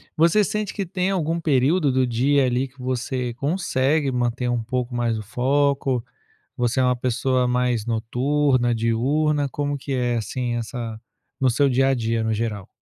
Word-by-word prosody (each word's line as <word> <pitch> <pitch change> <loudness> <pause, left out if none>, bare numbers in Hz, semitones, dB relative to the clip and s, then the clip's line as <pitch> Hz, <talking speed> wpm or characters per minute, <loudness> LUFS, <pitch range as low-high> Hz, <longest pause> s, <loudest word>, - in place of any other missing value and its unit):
você 170 +6 +4
sente 210 0 -2
que 200 -3 -3
tem 180 +1 -1
algum 170 -3 0
período 145 +1 +2
do 130 0 +2
dia, 130 +3 +2
ali, 125 +2 0
que 130 +1 -25
você 125 -1 -2
consegue 145 -2 0
manter 125 0 -1
um 120 -2 -1
pouco 125 +1 -3
mais 120 -2 0
o 110 - -5
foco? 135 +2 +1 0.5
Você 125 +2 0
é - - +4
uma 125 -1 +2
pessoa 125 +1 0
mais 125 -3 0
noturna, 125 +2 +1
diurna, 140 +6 +1
como 145 +1 -2
que 135 +1 -6
é, 120 -2 0
assim, 120 +2 -2
essa 115 -1 -5 0.4
no 130 -1 +3
seu 140 +4 +3
dia 135 +1 +3
a 135 - +3
dia, 115 -1 -1
no 110 - 0
geral? 105 -3 -3
130 Hz, 175 wpm, -23 LUFS, 120-145 Hz, 0.5 s, você